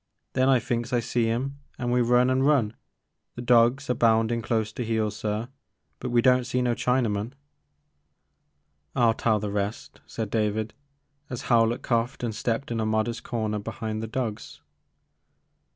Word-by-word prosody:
Then 130 +1 +3
I 135 - +6
thinks 120 +1 -2
I 125 - +2
see 115 0 0
*im 135 +5 -2 0.2
an' 120 -1 -2
we 125 0 +3
run 125 +2 +4
an* 130 0 +2
run, 135 -6 +2 0.6
the - - -6
dawgs 120 +3 +4
a 125 - +2
boundin' 115 0 +2
close 110 -2 -1
to 125 - -3
heel 110 -2 0
sir, 105 +2 -3 0.5
but 125 - -4
we 120 -1 +3
don't 125 -1 +4
see 125 - -1
no 120 -1 +2
Chinaman." 120 -2 0 1.6
I 120 - +2
'11 115 -1 +4
tell 110 -2 +2
the 105 -1 -3
rest, 100 +2 -4
said 110 -3 -5
David, 110 -1 0 0.6
as 125 - -5
Howlett 115 0 +2
coughed 120 +1 -1
and 115 -2 -1
stepped 115 +4 -2
in 115 - -1
a 110 - 0
modest 110 +2 0
comer 110 -3 -2
behind 110 +1 -4
the 110 - -4
dogs. 115 -2 -4
115 Hz, 170 wpm, -26 LUFS, 110-125 Hz, 1.6 s, I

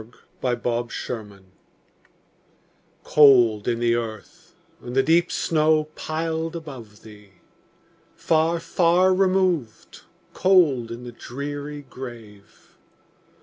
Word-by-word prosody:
Emily 125 -2 0
Brontë 120 0 -3
Remembrance 105 -5 -7 1.6
COLD 120 -8 +5
in 120 -1 0
the 120 0 +2
earth, 115 -3 -6 0.3
and 120 +1 -8
the 135 - +4
deep 170 +4 +2
snow 155 -1 +1
piled 160 +1 -3
above 130 -10 -10
thee! 105 -2 -15 0.8
Far, 165 +1 +1
far 175 +2 +2
removed, 185 - 0 0.3
cold 155 -11 +3
in 120 +1 -8
the 120 - -8
dreary 145 +4 -7
grave! 115 -7 -12
135 Hz, 100 wpm, -23 LUFS, 115-160 Hz, 1.6 s, COLD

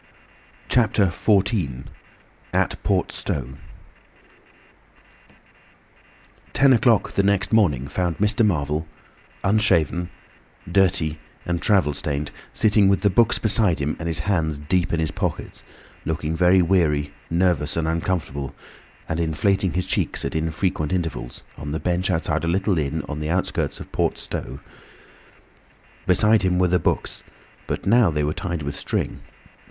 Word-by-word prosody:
CHAPTER 110 -4 +3
XIV. 95 - 0 0.7
AT - - 0
PORT - - 0
STOWE 65 0 -4 2.9
Ten 135 -1 +5
o'clock 115 -3 +3
the - - +1
next 100 0 +1
morning 75 - +3
found 85 +2 -2
Mr. 105 +2 +2
Marvel, 75 -5 0 0.6
unshaven, 90 -5 +2 0.6
dirty, 85 -4 +1 0.3
and 85 -1 -2
travel 95 -8 +3
stained, 70 0 -2 0.2
sitting 105 -2 +3
with 100 0 +2
the 100 - +3
books 115 +4 +3
beside 105 -5 +3
him 75 +1 -2
and 85 - -4
his 80 -2 +1
hands 80 -4 0
deep 85 +5 0
in 85 - 0
his 80 -2 0
pockets, - - -4 0.4
looking 80 0 -2
very 90 +2 +4
weary, 75 -5 +1 0.2
nervous, 85 -4 +1
and 80 -1 0
uncomfortable, 80 -5 -2 0.5
and 80 - -2
inflating 85 +3 +1
his 90 0 -1
cheeks - - -1
at 70 - -3
infrequent 80 0 -1
intervals, 80 -9 -3 0.2
on 75 0 -5
the 80 - -2
bench 90 +1 -1
outside 80 -3 0
a - - -1
little 95 +1 +1
inn 75 +1 -2
on 75 0 -5
the 75 0 -3
outskirts 90 +2 -1
of - - -10
Port - - 0
Stowe. - - -6 1.5
Beside 105 +4 +5
him 90 -2 +1
were 90 0 +3
the 90 +1 +2
books, - - -2 0.5
but - - -4
now 115 -1 +5
they 75 -2 -1
were 75 +1 0
tied 85 -4 -4
with 70 0 -4
string. - - -3
85 Hz, 140 wpm, -23 LUFS, 75-95 Hz, 2.9 s, Ten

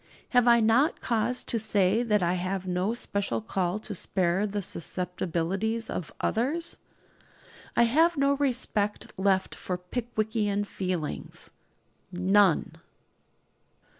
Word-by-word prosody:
Have 245 -1 +4
I 235 -1 +6
not 230 +8 +3
cause 235 +1 0
to 230 - -1
say 210 0 +2
that 210 -5 +1
I 175 +1 +2
have 185 +1 -2
no 185 +5 0
special 200 - -1
call 175 - -1
to 215 -1 -6
spare 190 +1 0
the 205 0 -3
susceptibilities 180 +6 -2
of 175 - -4
others? 295 +9 -1 1.0
I 235 - +5
have 320 +8 +3
no 280 0 +3
respect 240 -6 -1
left 190 0 +1
for 180 - -4
Pickwickian 215 +1 -2
feelings 180 -6 -4 0.6
none. 185 -1 +3
205 Hz, 115 wpm, -28 LUFS, 185-235 Hz, 1.0 s, I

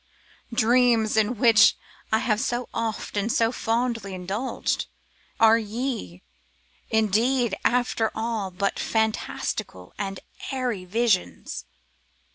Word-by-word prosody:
Ah! - - -6
dreams 230 -1 +3
in 220 +2 +2
which 225 -1 +6 0.3
I 220 - +4
have 220 -1 0
so 245 -1 -1
oft 225 -2 -3
and 205 +3 0
so 225 0 +2
fondly 230 -4 -1
indulged, 195 +8 -2 0.5
are 225 0 +6
ye, 220 - -4 0.7
indeed, 220 +2 +2
after 240 -2 +1
all, 220 -3 -2
but 195 +2 -2
fantastical 220 - -2
and 195 -2 -3 0.3
airy 250 -8 -2
visions? 215 0 0
225 Hz, 105 wpm, -25 LUFS, 205-240 Hz, 0.7 s, which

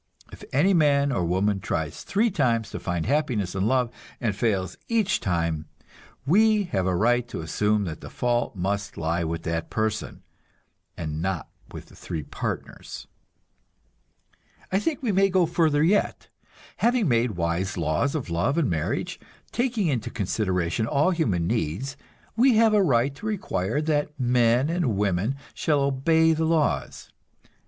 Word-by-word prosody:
If - - -12
any 175 +9 +3
man 140 -4 +3
or 95 -9 0
woman 95 +4 +1
tries 80 -4 -3
three 220 +3 +1
times 115 -6 0
to - - -5
find 85 -3 -2
happiness 125 -9 0
in 95 +2 0
love, 125 -1 +1 0.3
and 110 -5 -1
fails 95 -5 0
each 220 -4 +1
time, 85 -4 -1 0.6
we 210 +6 +4
have 95 -2 0
a 90 - +1
right 120 +5 +2
to 115 - -5
assume 105 +6 +1
that 80 -4 -5
the - - -8
fault 120 -2 -1
must 100 +2 -2
lie 85 +2 -1
with 80 0 -3
that 80 0 -3
person, 110 -1 -2 0.7
and 80 -1 -4
not 95 -2 -2 0.2
with - - -9
the - - -18
three 80 -3 -5
partners. - - -6 1.7
I 190 - +2
think 290 +4 -2
we 230 - +1
may 195 +1 +3
go 185 -2 +3
further 160 -3 +2
yet; 200 +5 +1 0.5
having 235 -4 +2
made 120 -3 +2
wise 85 +4 -1
laws 85 - 0
of 130 - -4
love 100 - 0
and 165 -6 +2
marriage, 80 -2 -2 0.3
taking 240 -4 0
into 130 -8 -1
consideration 95 0 -1
all 150 +4 +2
human 105 - 0
needs, 115 - -2 0.4
we 245 +2 +5
have 220 0 +5
a 210 - +5
right 135 -5 +2
to 210 +10 -7
require 155 - -1
that 150 -1 -1
men 120 +1 +3
and 165 - 0
women 100 +5 0 0.2
shall 150 -3 +1
obey 160 +4 +3
the 160 +1 0
laws. 160 -2 0
120 Hz, 155 wpm, -25 LUFS, -, 1.7 s, we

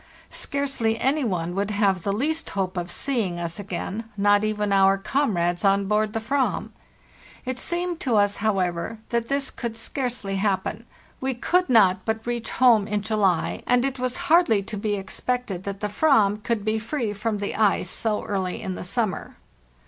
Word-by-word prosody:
Scarcely 270 -6 -1
any 285 +3 +2
one 175 -6 -1
would 200 +2 -1
have 200 -3 +1
the 200 - -1
least 305 +10 -1
hope 190 -2 -2
of 175 -1 -3
see 270 +2 0
ing 175 -4 -3
us 170 +2 -1
again, 205 +3 -4
not 205 +1 +4
even 210 -1 0
our 195 0 +5
comrades 195 -7 0
on 195 0 +3
board 210 +1 +1
the 225 - -1
/vaz. 265 +4 0 0.8
It 255 0 -3
seemed 345 -1 -2
to 245 -5 0
us, 205 -1 +3
however, 195 -1 -1
that 235 -1 0
this 275 +1 -1
could 235 -2 -5
scarcely 230 -4 -3
happen; 205 +3 -1 0.3
we 265 -1 -1
could 360 +9 +1
not 190 -6 +5
but 220 0 -2
reach 240 -1 -2
home 230 -5 +4
in 210 -1 -1
July, 205 -5 +1
and 245 +1 +3
it 270 -1 -2
was 255 0 -1
hardly 315 - +4
to 210 - -6
be 205 0 -1
expected 200 0 -3
that 200 0 -5
the 210 - 0
/vam 210 -3 +3
could 215 -2 -1
be 220 0 +1
free 230 -1 -2
from 215 +1 -2
the 200 0 -3
ice 205 -4 +2
so 215 -2 -1
early 190 -3 -2
in 190 - -4
the - - -6
summer. 205 +2 -2
215 Hz, 180 wpm, -24 LUFS, 195-245 Hz, 0.8 s, our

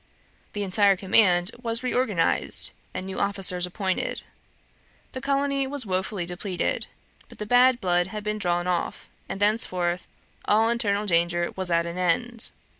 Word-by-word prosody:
The 205 - -2
entire 200 +1 +3
command 185 -1 +3
was 230 0 0
reorganized, 245 -9 +2 0.2
and 185 - -5
new 190 0 -5
officers 190 -3 +1
appointed. 190 0 -3 0.9
The 260 - -6
colony 275 0 0
was 275 -2 -1
wofully 190 -1 -2
depleted; 180 +1 -3 0.4
but - - -14
the 210 - -5
bad 245 +2 +4
blood 175 -3 +1
had 210 +2 -6
been 210 0 -2
drawn 175 -2 0
off, 180 -1 -3 0.2
and 195 - -4
thenceforth 185 -4 0 0.4
all 220 +2 +3
internal 210 -3 0
danger 170 -1 +1
was 185 -1 -3
at 170 0 +2
an 170 +1 -5
end. 230 +7 0
195 Hz, 145 wpm, -25 LUFS, 180-225 Hz, 0.9 s, bad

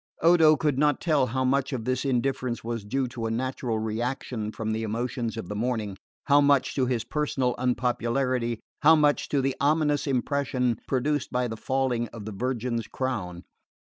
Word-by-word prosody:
Odo 165 -2 +6
could 145 -4 0
not 150 0 +3
tell 150 -6 +2
how 130 +2 -1
much 135 +1 +1
of 120 -5 -3
this 130 0 0
indifference 130 -1 -1
was 115 -2 -3
due 130 +5 -1
to 115 -2 -4
a - - -2
natural 120 0 -2
reaction 110 0 -3
from 110 0 -3
the 110 +1 -1
emotions 115 +1 -3
of 110 - -5
the 105 - -5
morning, 110 -3 -2 0.3
how 145 +1 +5
much 140 -2 +3
to 130 -2 +1
his 120 -3 0
personal 135 -5 -1
unpopularity, 125 -1 0 0.2
how 160 +2 +7
much 150 -2 +2
to 140 - +1
the 135 0 0
ominous 150 0 +2
impression 130 -3 0
produced 145 +2 0
by 125 0 0
the 110 - -5
falling 125 0 -1
of 110 -3 -10
the 110 - -5
Virgin's 120 0 -2
crown. 95 -10 -3
125 Hz, 180 wpm, -26 LUFS, 115-135 Hz, 0.3 s, how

